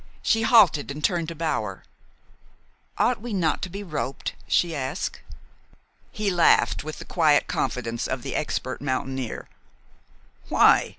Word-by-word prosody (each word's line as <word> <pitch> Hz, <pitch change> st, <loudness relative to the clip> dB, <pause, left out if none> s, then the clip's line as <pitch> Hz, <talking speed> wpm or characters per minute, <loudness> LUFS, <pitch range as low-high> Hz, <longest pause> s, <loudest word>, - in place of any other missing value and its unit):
She 225 Hz, -, +2 dB
halted 215 Hz, -, +5 dB
and 145 Hz, +2 st, -6 dB
turned 170 Hz, -1 st, +1 dB
to 165 Hz, -, -6 dB
Bower. 110 Hz, -, -2 dB, 1.1 s
"Ought 245 Hz, -3 st, +1 dB
we 240 Hz, -1 st, -5 dB
not 165 Hz, -6 st, 0 dB
to 185 Hz, -, -3 dB
be 200 Hz, +3 st, -6 dB
roped?" 150 Hz, -6 st, -4 dB
she 170 Hz, -2 st, +2 dB
asked. 140 Hz, +5 st, -3 dB, 0.9 s
He 210 Hz, -2 st, -1 dB
laughed, 175 Hz, -3 st, +3 dB
with 155 Hz, +1 st, -6 dB
the -, -, -9 dB
quiet 155 Hz, -4 st, +3 dB
confidence 120 Hz, -2 st, -2 dB
of -, -, -3 dB
the -, -, -4 dB
expert -, -, -3 dB
mountaineer. 130 Hz, -2 st, -3 dB, 1.0 s
"Why?" -, -, +5 dB
155 Hz, 135 wpm, -25 LUFS, 135-185 Hz, 1.1 s, halted